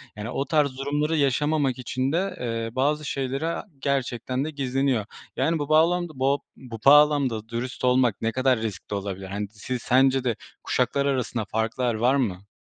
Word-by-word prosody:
yani, 105 +2 -5
o 135 +2 -2
tarz 140 -3 +1
durumları 145 +3 0
yaşamamak 140 -1 +1
için 130 +2 -2
de, 185 +3 -1
eee, 115 -1 -3
bazı 150 +3 +1
şeyler, 135 +1 -2
aaa, 165 +5 -2
gerçekten 130 -1 -1
de 155 - -4
gizleniyor. 135 -5 0 0.3
Yani, 165 -1 +1
bu 145 0 -3
bağlamda 170 +1 +3
bo 140 +2 +2 0.2
bu 120 -4 -9
bağlamda 140 -6 +5
dürüst 125 +3 -5
olmak 125 -4 +3
ne 115 0 0
kadar 130 -1 +2
riskli 105 -2 -5
olabilir? 95 -1 -4
Hani, 100 +2 -4
si 120 +4 -5
sence 130 +1 +3
de 120 -4 0 0.3
kuşaklar 140 0 0
arasında 125 -5 -1
farklar 115 +3 -1
var 125 +5 +3
mı? 100 -7 -1
130 Hz, 165 wpm, -25 LUFS, 115-145 Hz, 0.3 s, bağlamda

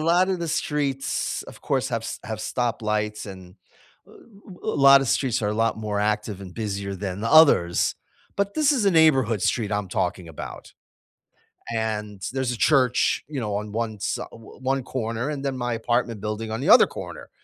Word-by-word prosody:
lotta 180 +3 +3
the 170 -1 -4
streets, 145 -3 -1
of - - -13
course, 135 -1 0
have 115 -2 -1
s - - -6
have 110 -2 -5
stoplights, 105 -3 -2
and 95 -1 -11 0.5
a - - -19 0.7
a 140 - -1
lotta 135 -1 +7
streets 130 0 +1
are 105 - +1
a 105 - -1
lot 115 0 +1
more 105 -2 -2
active 105 -1 -1
and 90 -2 -9
busier 100 -3 -3
than 95 0 -5
the 115 - 0
others, 140 - +5 0.4
but 200 0 0
this 305 -2 +3
is 250 -7 +1
a 195 - +5
neighborhood 135 - +4
street 110 -4 0
I'm 105 -2 -1
talking 90 -2 -2
about, 80 - -9 1.0
and 105 -3 -3
there's 130 -2 -1
a 120 - -4
church, 130 -4 +3
you 145 -3 -4
know, 105 -3 -2
on 105 0 -4
one 110 -1 -3
si - - -2
o - - -6
o - - -11 0.2
one 135 0 0
corner 115 +1 -3
and 145 -2 -4
then 135 -1 -2
my 120 -1 -2
apartment 115 -1 -1
building 110 +1 -4
on 110 - -3
the - - -1
other - - +8
corner. - - -8
115 Hz, 190 wpm, -24 LUFS, 105-135 Hz, 1.0 s, other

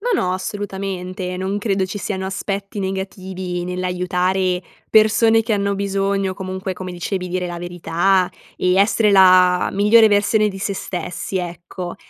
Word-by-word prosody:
No, - - -2
no, 180 - 0
assolutamente, 185 -2 -4
non 190 +2 -2
credo 195 -3 0
ci 190 - -6
siano 190 -2 -3
aspetti 195 +1 -4
negativi 190 -2 -4
nell'aiutare 180 0 -1 0.3
persone 225 +1 +5
che 225 -1 0
hanno 200 0 0
bisogno, 195 -1 -1
o - - -11
comunque, 190 0 -5
come 185 0 -7
dicevi, 180 +1 -3
dire 180 0 -2
la 175 - -5
verità 175 +2 +1 0.3
e 180 0 +2
essere 205 +2 +3
la 185 -2 +5
migliore 215 +3 +5
versione 210 +1 +3
di 195 -1 -7
sé 200 0 -2
stessi, 180 +1 -4
ecco. 175 0 -6
190 Hz, 150 wpm, -20 LUFS, 180-200 Hz, 0.3 s, persone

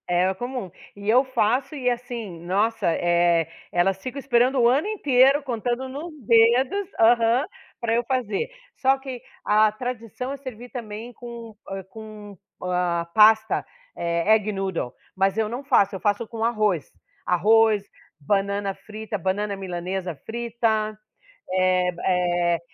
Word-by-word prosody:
É 180 +2 +2
comum. 245 0 -5 0.3
E 200 +1 -5
eu 250 +4 +6
faço 260 +2 0
e, 255 -3 0
assim 235 -7 -5
nossa, 205 +4 0
eh, 170 -1 +2 0.2
elas 190 +2 +1
ficam 255 +5 -5
esperando 255 0 +2
o 235 - +5
ano 275 +10 +2
inteiro, 280 -8 +4
contando 245 0 -2
nos 290 +6 -7
dedos 240 - +4
aham, 230 +3 +4 0.3
pra 230 -2 0
eu 240 - +1
fazer. 240 - -1 0.3
Só 270 +1 +3
que 265 -3 -7 0.2
a 215 +1 +4
tradição 245 +2 -5
é - - -6
servir 250 -3 -9
também 230 -1 -7
com, 235 -2 -9
hã, 195 0 -5
com, 210 0 -11 0.3
ah, 180 -2 0
pasta, 220 0 +5 0.3
eh, 170 +4 +1
egg 215 -1 -1
noodle, 190 -10 -3 0.2
mas 195 +1 +1
eu 220 -1 +1
não 240 +5 -5
faço. 205 -8 +3
Eu - - -5
faço 205 +3 0
com 225 0 -5
arroz. 215 -8 0 0.3
Arroz, 215 +3 +4 0.4
banana 200 +4 0
frita, 215 +2 -6
banana 200 +3 -1
à - - -5
milanesa 180 -1 -4
frita, 225 -2 -1 0.6
eh 185 -1 +2
b 175 - -11
eh 175 -2 +1
220 Hz, 145 wpm, -24 LUFS, 190-245 Hz, 0.6 s, eu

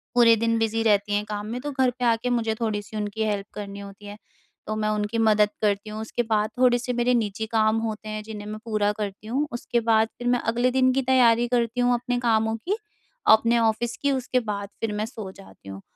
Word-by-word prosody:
पूरे 230 -2 +7
दिन 230 +1 +1
बिज़ी 225 0 0
रहती 205 -2 +2
हैं 205 - 0
काम 210 -1 -5
में, 235 +3 -4
तो 290 +2 -4
घर 260 -2 +2
पे 250 - 0
आके 230 +1 +1
मुझे 230 -2 0
थोड़ी-सी 215 -1 -3
उनकी 210 +1 -2
हेल्प 205 -2 -1
करनी 200 -1 -6
होती 200 +1 -11
है। 205 +1 -8 0.5
तो 215 - -2
मैं 215 0 -1
उनकी 210 +1 -1
मदद 215 -2 +4
करती 205 0 0
हूँ, 215 +1 -5
उसके 240 +2 -2
बाद 215 -1 0
थोड़े-से 250 0 +3
मेरे 245 +1 +2
निजी 220 -2 -1
काम 220 0 +3
होते 215 -1 -4
हैं, 215 0 -4
जिन्हें 210 -1 -8
मैं 215 0 -6
पूरा 215 -2 +1
करती 205 0 -5
हूँ। 275 +6 -1
उसके 240 0 -1
बाद 225 -1 +3
फ़िर 245 - -3
मैं 245 - +2
अगले 240 +3 +1
दिन 255 0 +3
की 270 - +1
तैयारी 240 -2 +4
करती 240 0 0
हूँ, 245 0 +3
अपने 245 0 -1
कामों 220 -2 +1
की, 385 - -2 0.6
अपने 230 +2 +3
ऑफ़िस 230 +1 0
की, 285 - +2
उसके 255 -1 0
बाद 205 -3 -4
फ़िर 220 -2 -1
मैं 210 - -1
सो 220 -5 -8
जाती 190 - -15
हूँ। 95 0 -8
220 Hz, 225 wpm, -25 LUFS, 210-240 Hz, 0.6 s, पूरे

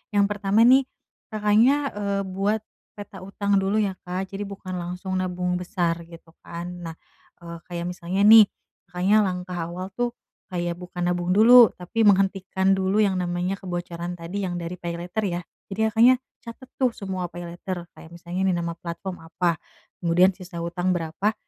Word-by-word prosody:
yang 200 0 +5
pertama 205 +2 +2
nih, 265 +2 +6 0.4
Kakaknya, 215 +5 +4 0.2
eee, 200 -1 -1
buat 200 +3 -1 0.3
peta 205 -1 -9
hutang 200 +1 0
dulu, 195 +2 0
ya, 205 -3 +1
Kak. 185 +2 -4
Jadi 200 +1 -5
bukan 195 -2 -7
langsung 180 +2 -5
nabung 180 -1 -1
besar 175 -2 -1
gitu, 165 -1 -14
kan. 170 +1 -7
Nah, 165 -1 -6 0.5
eee, 170 0 -7
kayak 170 -1 -4
misalnya 180 +2 -2
nih, 215 -1 +9 0.4
Kakaknya 190 +4 +3
langkah 180 -1 -4
awal 185 +2 -6
tuh 245 0 -2 0.3
kayak 175 -1 -3
bukan 180 0 -6
nabung 175 0 0
dulu, 230 +2 +8
tapi 215 +5 -1
menghentikan 195 -1 +3
dulu 190 +3 +2
yang 195 -3 +2
namanya 180 +2 -1
kebocoran 175 -1 -5
tadi 175 +4 -4
yang 175 - -4
dari 170 +2 -5
pay 170 -1 -4
later, 180 +6 -3
ya. 175 -1 -2 0.3
Jadi 195 - -5
Kakaknya 230 +4 +6 0.3
catet 235 +2 -10
tuh 250 -3 +2
semua 185 -2 -4
pay 175 0 -8
later. 175 +1 -6
Kayak 165 - -13
misalnya 175 +2 -5
nih 185 - +2
nama 170 - -2
platform 175 +2 -6
apa, 170 0 0 0.4
kemudian 175 +2 +4
sisa 180 -2 -8
hutang 175 +2 -1
berapa, 170 +5 -1
185 Hz, 170 wpm, -24 LUFS, 175-200 Hz, 0.5 s, nih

